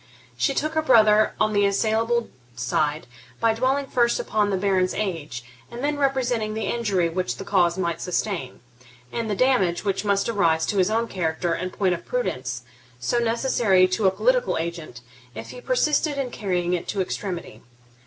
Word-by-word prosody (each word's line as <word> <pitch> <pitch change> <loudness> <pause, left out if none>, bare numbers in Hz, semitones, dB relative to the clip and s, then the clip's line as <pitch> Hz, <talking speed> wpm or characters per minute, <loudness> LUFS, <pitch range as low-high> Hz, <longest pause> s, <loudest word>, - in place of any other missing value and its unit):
She 275 - 0
took 310 +1 -1
her 315 - +2
brother 215 -7 +5
on 215 - +2
the 205 -1 +3
assailable 225 +3 0 0.2
side, 145 +5 -1 0.3
by 230 -1 +3
dwelling 260 +5 0
first 240 -3 +1
upon 210 -1 0
the 195 - 0
Baron's 185 -1 +1
age, 165 - -3 0.3
and 240 +2 -7
then 290 0 0
representing 245 -6 0
the 220 - -2
injury 205 -7 0
which 180 +2 -2
the 195 - -7
cause 180 -3 +2
might 170 -3 -2
sustain, 180 - -3 0.5
and 230 -2 -3
the 205 - 0
damage 200 -7 +2
which 195 0 0
must 200 -1 +1
arise 165 -8 +2
to 200 - 0
his 185 +1 +3
own 230 +2 0
character 170 -2 -1
in 185 +2 -3
point 185 -1 0
of 170 - -5
prudence 130 - -3 0.4
so 125 - 0
necessary 230 -5 +3
to 190 +2 +1
a - - +7
political - - +1
agent, 165 -7 -5 0.3
if - - -7
he - - -10
persisted 305 - +1
in 265 -3 -2
carrying 180 -5 -1
it 175 - -2
to 200 - -1
extremity. 180 - -5
205 Hz, 175 wpm, -24 LUFS, 175-235 Hz, 0.5 s, a